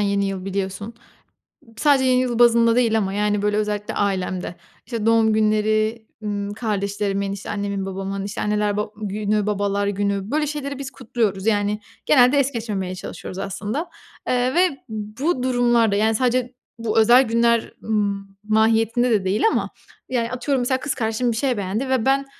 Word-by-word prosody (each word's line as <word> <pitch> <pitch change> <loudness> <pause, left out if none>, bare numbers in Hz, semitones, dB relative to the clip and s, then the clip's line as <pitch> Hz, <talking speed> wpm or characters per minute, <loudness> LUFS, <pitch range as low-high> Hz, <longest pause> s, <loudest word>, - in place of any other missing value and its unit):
yeni 200 -1 +1
yıl 195 -1 -4
biliyorsun. 195 +3 -4 0.8
Sadece 280 -3 +3
yeni 255 -1 +4
yıl 245 -2 -1
bazında 235 -1 +5
değil 230 -3 +3
ama, 195 -3 -1
yani, 205 0 0
böyle 210 0 +1
özellikle 210 -1 -2
ailemde, 185 -3 -2 0.3
işte, 230 -3 -4
doğum 225 -1 +4
günleri, 215 +1 +1 0.2
ımm, 205 -1 -3
kardeşlerimin, 200 -2 -2
işte, 200 0 -7
annemin 200 -1 -2
babamın, 195 +1 -4
işte, 205 - -5
anneler 210 -1 0
ba 210 - -1
günü, 210 0 -1
babalar 200 -1 0
günü 200 +1 -1
böyle 300 +1 +1
şeyleri 280 -2 -4
biz 270 -1 -6
kutluyoruz, 220 -6 -2
yani. 205 -1 +1 0.3
Genelde 255 0 +5
es 280 -1 +2
geçmemeye 205 -7 -3
çalışıyoruz 185 0 -8
aslında, 210 - -4 0.4
eee, 250 +1 +1
ve 350 -6 +2
bu 220 +7 -2
durumlarda, 240 -4 +3
yani, 220 +2 +2
sadece 250 +1 0 0.3
bu 225 -1 +1
özel 240 +4 +7
günler 235 -1 +1
m 205 -2 -1 0.2
mahiyetinde 225 +3 +2
de 205 -4 +2
değil 195 +3 0
ama, - - -1 0.4
yani, 240 -2 -1
atıyorum 260 +1 -1
mesela 260 +2 +1
kız 285 0 -3
kardeşim 235 0 0
bir 220 - -3
şey 255 -1 0
beğendi 205 +7 -2
ve 260 -4 +1
ben, 275 +1 +2
215 Hz, 165 wpm, -22 LUFS, 200-245 Hz, 0.8 s, özel